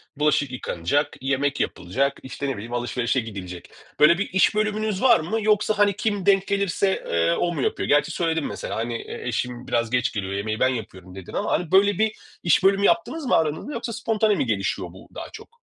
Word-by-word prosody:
bulaşık 145 Hz, -2 st, +1 dB
yıkanacak, 125 Hz, -, -1 dB
yemek 140 Hz, +1 st, 0 dB
yapılacak, 135 Hz, +11 st, -1 dB
işte, 130 Hz, +2 st, -5 dB
ne -, -, 0 dB
bileyim 115 Hz, +4 st, -8 dB
alışverişe 120 Hz, +1 st, 0 dB
gidilecek. 95 Hz, -6 st, -7 dB, 0.3 s
Böyle 160 Hz, +4 st, +6 dB
bir 200 Hz, -, -2 dB
iş 190 Hz, +2 st, +3 dB
bölümünüz 215 Hz, -1 st, 0 dB
var 245 Hz, -6 st, +6 dB
mı? 175 Hz, +8 st, -2 dB
Yoksa, 215 Hz, 0 st, +2 dB
hani, 205 Hz, -2 st, +3 dB
kim 205 Hz, -2 st, -1 dB
denk 195 Hz, -1 st, +4 dB
gelirse, 200 Hz, -1 st, 0 dB
eee, 85 Hz, 0 st, +2 dB
o 175 Hz, 0 st, 0 dB
mu 145 Hz, -, -3 dB
yapıyor? -, -, -1 dB
Gerçi 145 Hz, 0 st, +3 dB
söyledin 165 Hz, -3 st, -1 dB
mesela, -, -, -5 dB
hani 115 Hz, +1 st, -3 dB
eşim 125 Hz, 0 st, -4 dB
biraz 115 Hz, -1 st, 0 dB
geç 125 Hz, 0 st, +1 dB
geliyor, 95 Hz, -2 st, -3 dB
yemeği 110 Hz, +2 st, -2 dB
ben 130 Hz, -, +4 dB
yapıyorum 95 Hz, -6 st, -6 dB
dedin 95 Hz, -2 st, -10 dB
ama, -, -, -1 dB
hani, 175 Hz, -2 st, -1 dB
böyle 195 Hz, 0 st, +4 dB
bir 220 Hz, 0 st, +1 dB, 0.3 s
iş 175 Hz, +2 st, +3 dB
bölümü 200 Hz, +1 st, +4 dB
yaptınız 330 Hz, -3 st, +1 dB
mı -, -, +3 dB
aranızda 160 Hz, -, -1 dB
yoksa 230 Hz, 0 st, -4 dB
spontane 220 Hz, -1 st, +1 dB
mi 135 Hz, -, 0 dB
gelişiyor 100 Hz, -4 st, -1 dB
bu 95 Hz, -, -15 dB
daha -, -, -7 dB
çok? 470 Hz, 0 st, -13 dB
150 Hz, 200 wpm, -24 LUFS, -, 0.3 s, Böyle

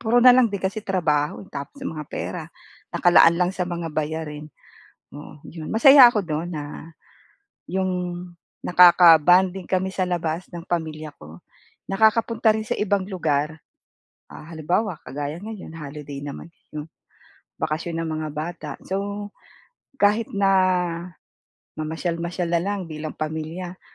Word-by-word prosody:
puro 240 Hz, +2 st, +3 dB
na 250 Hz, -, +10 dB
lang 250 Hz, -1 st, +5 dB
din 200 Hz, -, -3 dB
kasi 195 Hz, +3 st, -3 dB
trabaho, 165 Hz, -6 st, -1 dB
eh, -, -, -19 dB
tapos 140 Hz, -, -7 dB
mga 155 Hz, -, -5 dB
pera -, -, -5 dB, 0.5 s
nakalaan 175 Hz, -1 st, +5 dB
lang 180 Hz, 0 st, +1 dB
sa 180 Hz, -2 st, -3 dB
mga 170 Hz, -2 st, -4 dB
bayarin. 155 Hz, -1 st, -4 dB, 0.6 s
Oo, 145 Hz, 0 st, -12 dB
'yon. 160 Hz, -2 st, -9 dB
Masaya 265 Hz, +3 st, +8 dB
ako 220 Hz, -4 st, +1 dB
do'n 160 Hz, 0 st, -3 dB
na 145 Hz, +1 st, -7 dB, 0.8 s
'yong 190 Hz, +1 st, -1 dB, 0.7 s
nakaka-bonding 180 Hz, +1 st, +6 dB
kami 190 Hz, 0 st, 0 dB
sa 185 Hz, -1 st, -1 dB
labas 170 Hz, 0 st, -2 dB
ng 170 Hz, -2 st, -9 dB
pamilya 155 Hz, -3 st, -4 dB
ko. 80 Hz, +3 st, -13 dB, 0.5 s
Nakakapunta 220 Hz, +1 st, +3 dB
rin 220 Hz, -, -2 dB
sa 215 Hz, -, -2 dB
ibang 200 Hz, -2 st, +1 dB
lugar. 160 Hz, -5 st, -1 dB, 0.7 s
Ah, 155 Hz, -, -12 dB
halimbawa 170 Hz, +3 st, -1 dB
kagaya 145 Hz, +4 st, -5 dB
ngayon 190 Hz, -7 st, -8 dB
holiday 145 Hz, -1 st, -8 dB
naman 145 Hz, +4 st, -8 dB, 0.2 s
'no, 150 Hz, +1 st, -6 dB, 0.7 s
bakasyon 165 Hz, +2 st, -3 dB
ng 165 Hz, -, -4 dB
mga 155 Hz, -, -3 dB
bata. 160 Hz, 0 st, -5 dB
So, 200 Hz, +1 st, -4 dB, 0.7 s
kahit 210 Hz, +2 st, +2 dB
na 200 Hz, -1 st, +2 dB, 1.3 s
mamasyal-masyal 170 Hz, +2 st, -3 dB
na 170 Hz, -, +3 dB
lang 200 Hz, +2 st, -2 dB
bilang 155 Hz, -2 st, -7 dB
pamilya, 160 Hz, +4 st, -5 dB
170 Hz, 135 wpm, -23 LUFS, 155-195 Hz, 1.3 s, na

